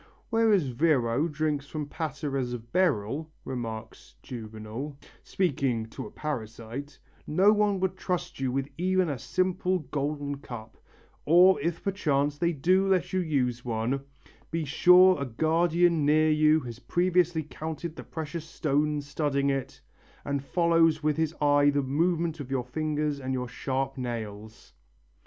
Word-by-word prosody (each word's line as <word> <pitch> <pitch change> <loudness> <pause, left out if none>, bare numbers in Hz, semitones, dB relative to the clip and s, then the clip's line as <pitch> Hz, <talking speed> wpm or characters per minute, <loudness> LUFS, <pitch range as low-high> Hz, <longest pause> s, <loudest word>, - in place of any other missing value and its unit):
"Whereas 215 - +3
Virro 145 +1 +2
drinks 150 -1 -1
from 150 0 -4
pateras 140 -4 -3
of 115 0 -11
beryl," 155 - +1 0.2
remarks 115 -3 -6
Juvenal, 115 +4 -7 0.3
speaking 135 -10 0
to 110 - -7
a - - -10
parasite, 120 0 -6 0.3
"no 190 +7 +5
one 210 -2 +2
would 190 0 0
trust 180 -6 -3
you 130 -2 0
with 135 +1 -1
even 185 -1 +2
a 140 -4 -3
simple 185 +4 0
golden 145 -1 -3
cup, 115 -5 -9 0.5
or, 180 +4 +6
if 165 +2 -2
perchance 145 -7 0
they 170 0 +2
do 180 +6 +2
let 180 -2 +1
you 185 - +2
use 130 -8 0
one, 120 +3 -1 0.5
be 165 -1 -2
sure 180 +3 +6
a - - 0
guardian 165 +5 +2
near 155 +2 +4
you 155 +1 +4
has 120 -2 -8
previously 175 -1 +1
counted 160 +2 -6
the - - -8
precious 160 0 -5
stones 150 -2 -1
studding 140 -1 0
it 135 -2 -4 0.4
and 140 -1 -2
follows 165 -1 +3
with 150 -1 +2
his 160 0 0
eye 145 -1 +4
the 145 -1 +1
movements 165 +3 0
of 135 -3 -7
your 130 -3 -1
fingers 150 +1 -2
and 130 -1 -3
your 125 -1 -3
sharp 135 +2 -3
nails." 110 -3 -6
150 Hz, 145 wpm, -28 LUFS, 130-170 Hz, 0.5 s, or